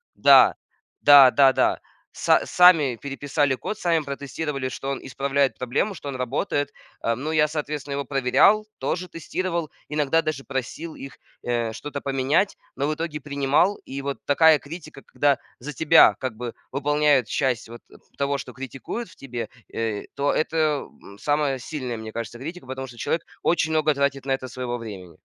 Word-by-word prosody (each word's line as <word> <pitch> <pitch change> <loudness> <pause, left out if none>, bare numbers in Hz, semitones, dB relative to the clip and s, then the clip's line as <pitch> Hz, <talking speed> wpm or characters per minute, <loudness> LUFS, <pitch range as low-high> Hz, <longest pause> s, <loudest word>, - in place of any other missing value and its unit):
Да, - - +7 0.5
да, 140 -3 +9
да, 135 -2 +6
да. - - +2 0.3
Са - - +3
сами 160 -9 +5
переписали 140 0 0
код, 215 - -5
сами 165 -4 +1
протестировали, 140 0 -4
что 135 +2 -5
он 140 - -2
исправляет 135 +1 0
проблему, 130 - -1
что 145 -4 -7
он 130 - -5
работает. 140 +3 -1 0.3
Ам. 115 +2 -1
Ну 155 - -2
я, 155 -1 +3
соответственно, 150 -2 -4
его 140 0 -2
проверял, 140 +11 +3
тоже 180 0 -2
тестировал, 170 0 -3 0.2
иногда 150 +2 +1
даже 150 -4 -3
просил 140 +5 -5
их, 135 -1 -10 0.3
э, 120 -2 -1
что-то 140 +4 -6
поменять, 140 +8 +1 0.2
но 140 - -1
в - - +1
итоге 160 -2 -4
принимал. 145 +7 +1
И 135 +1 -6
вот 140 0 -3
такая 155 +1 +5
критика, 155 -2 -10
когда 145 -1 +1 0.2
за 145 +5 -6
тебя 160 +3 +6
как 130 -4 -4
бы 120 0 -6 0.2
выполняют 145 -3 +2
часть 125 -2 -1
вот, 120 - -10
э, - - -17 0.2
того, 140 0 0
что 130 -1 -8
критикуют 135 - -6
в - - -17
тебе, 120 -4 -6 0.3
э, 110 -2 -2
то 140 +1 +1
это, 155 -2 0 0.2
м, 100 - -13
самая 145 -2 0
сильная, 130 -3 -5
мне 110 0 -7
кажется, 115 0 -6
критика, 160 +1 -8
потому 130 0 -5
что 120 -1 -13
человек 165 +7 -1 0.2
очень 160 -2 +1
много 155 -1 +2
тратит 140 -1 0
на 135 - +1
это 130 -1 -4
своего 125 -1 -4
времени. 95 -7 -9
140 Hz, 175 wpm, -24 LUFS, 130-155 Hz, 0.5 s, да